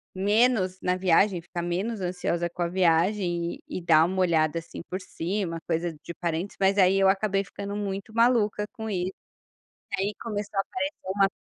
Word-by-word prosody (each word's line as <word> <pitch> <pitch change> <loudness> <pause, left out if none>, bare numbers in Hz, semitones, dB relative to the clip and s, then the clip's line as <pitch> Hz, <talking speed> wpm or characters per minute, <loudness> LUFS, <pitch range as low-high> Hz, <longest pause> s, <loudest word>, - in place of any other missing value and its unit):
menos 205 -1 +2
na 180 0 +1
viagem, 185 0 +3
ficar 175 +1 -5
menos 190 +5 -2
ansiosa 175 -1 -1
com 175 - -7
a 170 - +1
viagem 175 0 +1
e 185 - -5
dar 160 -2 +5
um 190 +2 -3
olhada 165 -3 +2
assim 165 - -9
por 185 - -3
cima, 180 0 -3
coisa 170 +1 0
de 170 - -7
parentes 170 +3 -2
mas 195 +1 +3
aí 190 0 +5
eu 195 - +5
acabei 195 0 +1
ficando 200 0 -6
muito 200 +1 -4
maluca 225 -3 +3
com 220 -1 -5
isso, 185 -1 -2 0.8
aí 195 +2 0
começou 205 -3 -4
a - - +5
aparecer 285 - -4
uma 195 -1 +4
190 Hz, 175 wpm, -26 LUFS, 175-205 Hz, 0.8 s, dar